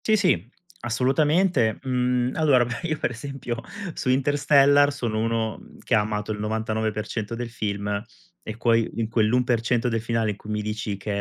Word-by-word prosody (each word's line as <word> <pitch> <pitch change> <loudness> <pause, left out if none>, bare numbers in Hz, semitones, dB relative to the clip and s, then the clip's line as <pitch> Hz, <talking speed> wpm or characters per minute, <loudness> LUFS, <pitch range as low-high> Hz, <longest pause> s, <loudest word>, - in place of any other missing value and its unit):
Sì, 220 - +4
sì, 175 - +1 0.3
assolutamente. 135 - +2
Mhmm, 125 -1 +1
allora, 140 -6 +4
beh, 120 0 -4
io 155 -1 -1
per - - -1
esempio 125 -1 -5 0.3
su - - -3
Interstellar 145 +1 +4
sono 120 -6 -2
uno 115 -1 -1 0.2
che - - -2
ha 110 - +6
amato 105 0 -2
il 105 - -4
99% 110 0 -2
del 120 0 -5
film 100 -2 -2 0.4
e 110 - -7
puoi 115 -1 +2
in 115 -1 -1
quell'1% 120 +1 +1
del 115 -1 -1
finale 115 -2 0
in 105 - -8
cui 105 - -12
mi 105 0 -2
dici 105 -1 -3
che: 100 +1 -3
115 Hz, 165 wpm, -24 LUFS, 110-130 Hz, 0.4 s, ha